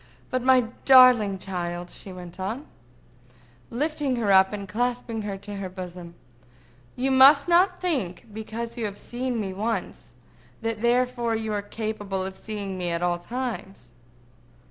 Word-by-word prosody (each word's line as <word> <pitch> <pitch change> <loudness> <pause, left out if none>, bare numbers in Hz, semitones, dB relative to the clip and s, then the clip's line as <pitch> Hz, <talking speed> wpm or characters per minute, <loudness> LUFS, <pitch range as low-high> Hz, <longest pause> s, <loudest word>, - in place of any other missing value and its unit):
—But, 255 - 0
my 260 0 +5 0.2
darling 250 -7 +7
child," 175 -2 -5
she 195 - -9
went 180 -1 -10
on, 220 +10 -4 1.0
lifting 290 +1 -1
her 220 -4 +1
up 190 0 +6
and 200 -1 -5
clasping 240 +1 -2
her 205 -2 -4
to 200 +1 -8
her 195 -1 -4
bosom, 180 -2 -8 0.8
"you 265 +2 0
must 275 +3 +7
not 360 +2 +4
think, 260 - -2
because 230 +2 -6
you 225 - -1
have 205 -1 -5
seen 245 +1 -3
me 195 -3 -3
once, 220 +4 -4 0.5
that 225 -1 -2
therefore 240 -1 +1
you 220 -1 -3
are 205 - -1
capable 205 -2 -4
of 190 0 -6
seeing 200 -3 -6
me 175 -1 -1
at 170 0 -1
all 175 0 +1
times. 195 - -6
215 Hz, 150 wpm, -25 LUFS, 190-250 Hz, 1.0 s, darling